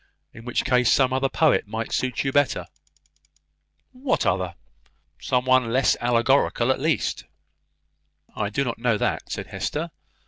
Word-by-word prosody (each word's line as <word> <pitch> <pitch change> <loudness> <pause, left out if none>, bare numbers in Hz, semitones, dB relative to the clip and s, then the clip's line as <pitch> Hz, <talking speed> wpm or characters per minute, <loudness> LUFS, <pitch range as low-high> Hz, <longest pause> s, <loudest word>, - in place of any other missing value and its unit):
In 115 - -12
such 125 - 0
a - - -21
case, 125 -2 +3
some 130 -2 +3
other 135 +1 +1
poet 155 -8 +2
might 110 +2 -4
suit 130 -1 -1
you 135 - -1
better." 145 0 +1 1.3
"What 260 0 -1
other?" 90 -1 0 0.7
"Some 125 0 0
one 130 -3 +3
less 130 +2 +3
allegorical, 120 +1 +2
at - - -1
least." 155 +3 -1 1.1
"I 105 -1 -2
do 135 +6 -1
not 115 -4 -4
know 115 -2 +1
that," - - -2
said - - -4
Hester. - - -4
125 Hz, 150 wpm, -24 LUFS, 115-135 Hz, 1.3 s, case